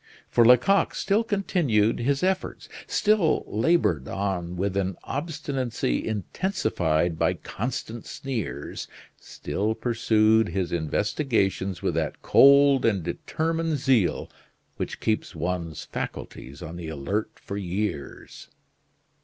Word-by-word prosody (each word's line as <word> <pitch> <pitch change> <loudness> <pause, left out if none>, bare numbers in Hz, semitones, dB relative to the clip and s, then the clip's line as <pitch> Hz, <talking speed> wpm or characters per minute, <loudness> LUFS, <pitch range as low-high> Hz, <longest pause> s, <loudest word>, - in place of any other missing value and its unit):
For 120 - +5
Lecoq 125 +12 +5
still 205 +3 +1
continued 175 - +1
his 135 +5 0
efforts; 190 0 -1 0.2
still 205 -7 +2
labored 105 - +1
on 90 -2 -3
with 95 +1 -1
an 95 -2 -1
obstinacy 140 - -2
intensified 90 - -1
by - - +2
constant 115 0 -5
sneers; 115 - -5 0.3
still 105 +9 -3
pursued 110 -2 +3
his 90 0 -2
investigations 95 - 0
with - - +1
that - - -2
cold 140 -1 +6
and 100 -6 +2
determined 160 - -1
zeal 125 -9 +2 0.5
which - - -4
keeps 110 -3 -1
one's 85 -1 -3
faculties 70 +3 -7
on 80 +2 -7
the 85 -2 -6
alert 80 +9 -2
for 100 - -6
years. 95 -5 -4
110 Hz, 110 wpm, -25 LUFS, 90-140 Hz, 0.5 s, cold